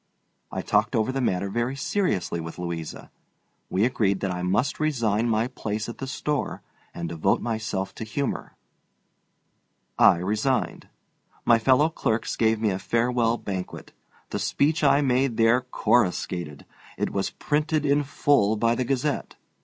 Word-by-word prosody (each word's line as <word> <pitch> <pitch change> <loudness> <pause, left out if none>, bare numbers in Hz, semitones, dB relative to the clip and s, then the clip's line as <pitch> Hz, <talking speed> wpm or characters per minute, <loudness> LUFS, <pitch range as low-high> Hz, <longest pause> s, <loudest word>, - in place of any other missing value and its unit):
I - - -3
talked - - +1
over 110 +3 +1
the 135 0 -2
matter 100 -5 0
very 120 +6 -1
seriously 140 - -1
with 80 0 -7
Louisa. 85 -3 -6 0.6
We 95 +4 +2
agreed 100 -6 +1
that 95 - -1
I 90 0 -3
must 100 +9 0
resign 120 -7 +1
my 110 +1 +1
place 110 -4 -4
at 120 - -8
the 135 - -4
store 145 +1 -2 0.3
and 85 -1 -5
devote 80 -1 +1
myself 110 -4 -3
to - - -6
humor. 130 +5 -3 1.4
I - - +7
resigned. 105 +8 -1 0.6
My 115 -1 +5
fellow 130 +6 +4
clerks 110 -8 -1
gave 110 -1 +2
me 110 -2 +1
a 95 - -2
farewell 120 0 +1
banquet. 95 -4 -6 0.4
The - - -2
speech 155 +3 +1
I 145 0 +5
made 130 -3 +1
there 115 +2 +4
coruscated. 90 - 0 0.3
It - - -1
was 100 -1 -1
printed 150 0 -1
in 145 +1 +3
full 135 -6 +2
by 115 +2 +2
the 130 - 0
Gazette. 135 +2 -1
115 Hz, 150 wpm, -25 LUFS, 100-135 Hz, 1.4 s, I